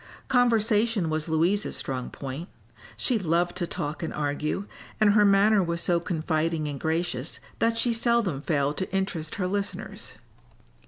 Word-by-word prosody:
Conversation 225 Hz, -6 st, +3 dB
was 155 Hz, +1 st, -2 dB
Louise's 175 Hz, +6 st, +1 dB
strong 130 Hz, -2 st, -3 dB
point. 140 Hz, +6 st, -6 dB, 0.5 s
She 245 Hz, -4 st, +1 dB
loved 175 Hz, -1 st, +1 dB
to 175 Hz, -, -1 dB
talk 150 Hz, -2 st, -4 dB
and 165 Hz, -, -3 dB
argue, 150 Hz, +5 st, -2 dB, 0.3 s
and 210 Hz, -2 st, +5 dB
her 210 Hz, -1 st, +5 dB
manner 200 Hz, +1 st, +5 dB
was 170 Hz, -1 st, -1 dB
so 170 Hz, 0 st, +2 dB
confiding 160 Hz, -1 st, -1 dB
and 145 Hz, -2 st, -4 dB
gracious 160 Hz, -4 st, -2 dB, 0.2 s
that 230 Hz, 0 st, +2 dB
she 235 Hz, +1 st, +2 dB
seldom 230 Hz, -, +1 dB
failed 145 Hz, -2 st, 0 dB
to 190 Hz, -, -3 dB
interest 190 Hz, -5 st, -2 dB
her 195 Hz, -, -1 dB
listeners. 200 Hz, +2 st, -3 dB
175 Hz, 150 wpm, -26 LUFS, 155-205 Hz, 0.5 s, and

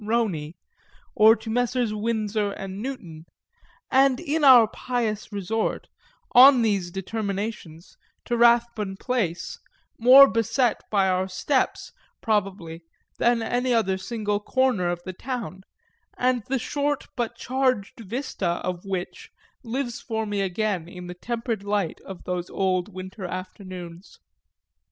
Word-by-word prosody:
Rowney 205 Hz, -9 st, -1 dB, 0.6 s
or 220 Hz, +1 st, +7 dB
to 220 Hz, 0 st, -7 dB
Messrs. 245 Hz, -1 st, 0 dB
Windsor 215 Hz, -1 st, -1 dB
and 195 Hz, +1 st, -7 dB
Newton, 180 Hz, -12 st, -7 dB, 0.6 s
and 265 Hz, -1 st, +4 dB
in 315 Hz, -1 st, -1 dB
our 250 Hz, -5 st, +8 dB
pious 225 Hz, -2 st, -3 dB
resort, 205 Hz, +2 st, -2 dB, 0.4 s
on 255 Hz, 0 st, +8 dB
these 200 Hz, -5 st, 0 dB
determinations, 195 Hz, -3 st, -5 dB, 0.3 s
to 240 Hz, -, -1 dB
Rathbone 235 Hz, -4 st, +3 dB
Place, 190 Hz, -10 st, -2 dB, 0.4 s
more 260 Hz, +4 st, +9 dB
beset 230 Hz, +2 st, +1 dB
by 195 Hz, -2 st, +2 dB
our 185 Hz, 0 st, +1 dB
steps, 255 Hz, +8 st, -1 dB, 0.3 s
probably, 190 Hz, -6 st, -2 dB, 0.4 s
than 235 Hz, -1 st, +2 dB
any 245 Hz, +2 st, 0 dB
other 195 Hz, -4 st, +1 dB
single 210 Hz, -1 st, -2 dB
corner 250 Hz, -4 st, +1 dB
of 175 Hz, 0 st, -3 dB
the 185 Hz, -, -5 dB
town, 230 Hz, -4 st, -5 dB, 0.6 s
and 250 Hz, -1 st, +1 dB
the 270 Hz, -, 0 dB
short 285 Hz, +3 st, -2 dB
but 240 Hz, -2 st, -2 dB
charged 255 Hz, -6 st, -1 dB
vista 210 Hz, -6 st, -3 dB
of 180 Hz, -1 st, -3 dB
which 190 Hz, -2 st, -5 dB, 0.3 s
lives 240 Hz, 0 st, -3 dB
for 220 Hz, -2 st, -3 dB
me 205 Hz, -1 st, -2 dB
again 190 Hz, -2 st, -1 dB
in 180 Hz, 0 st, -9 dB
the 175 Hz, -, -6 dB
tempered 230 Hz, +2 st, -4 dB
light 200 Hz, -4 st, -2 dB
of 190 Hz, -2 st, -9 dB
those 180 Hz, -1 st, -3 dB
old 185 Hz, 0 st, -1 dB
winter 185 Hz, +1 st, -8 dB
afternoons. 185 Hz, -1 st, -8 dB
215 Hz, 130 wpm, -25 LUFS, 185-240 Hz, 0.6 s, more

